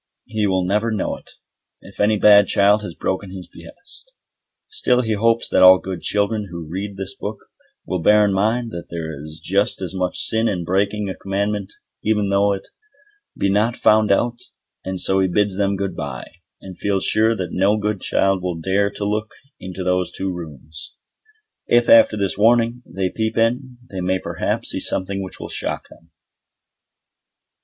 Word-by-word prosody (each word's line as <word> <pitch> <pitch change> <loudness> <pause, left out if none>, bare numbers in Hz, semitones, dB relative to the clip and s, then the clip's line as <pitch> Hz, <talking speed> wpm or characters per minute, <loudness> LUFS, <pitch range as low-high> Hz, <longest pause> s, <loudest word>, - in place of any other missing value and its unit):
He 110 -2 -1
will 95 -1 +1
never 105 +5 0
know 105 -3 -2
it, - - -16 0.5
if - - -15
any 105 +1 +3
bad 105 -1 +6
child 100 +1 +3
has 90 -5 -7
broken 95 +1 -3
his 90 -2 -9
behest. 175 - -13 0.6
Still 125 - +1
he 110 -3 -1
hopes 115 +2 +1
that - - +3
all 95 0 +9
good 95 -2 -6
children 105 0 0
who 85 -2 -7
read 95 +4 -5
this 95 +6 -6
book 105 -4 -6 0.5
will 95 - -2
bear 105 +4 +5
in 100 - +1
mind 110 +4 0
that 85 -3 -7
there 80 -1 -5
is 75 +1 -9
just 100 +5 0
as 95 -1 -5
much 90 -1 -2
sin 110 +1 +3
in 90 -5 -1
breaking 100 +4 0
a 95 - -3
commandment 100 +1 -3 0.3
even 105 -2 +1
though 100 +1 +3
it 95 -1 -4 0.7
be - - +1
not 105 +4 +1
found 110 -1 +4
out, 120 +4 +1 0.4
and 95 0 -4
so 95 +1 +2
he 95 - +3
bids 100 +1 0
them 100 -1 +1
good 100 0 -3
bye, 70 -5 -6 0.3
and 95 -2 -11
feels 100 -2 0
sure 110 +1 +3
that 90 -4 -4
no 100 +3 +2
good 105 -2 -2
child 95 -1 +1
will 90 -1 -2
dare 95 +4 +1
to 100 - -5
look 105 +1 -2 0.2
into 95 0 -6
those 90 0 0
two 95 -1 -3
rooms. 80 -1 -9 0.7
If, 120 0 +3
after 115 -1 +6
this 100 -1 -1
warning, 120 +2 +3
they 95 0 -2
peep 110 0 -2
in, 125 +3 0
they 95 -1 -4
may 95 +1 +1
perhaps - - -3
see - - -3
something 95 +1 0
which 95 - -8
will - - -6
shock - - -4
them. 80 - -19
100 Hz, 180 wpm, -20 LUFS, 95-105 Hz, 0.7 s, all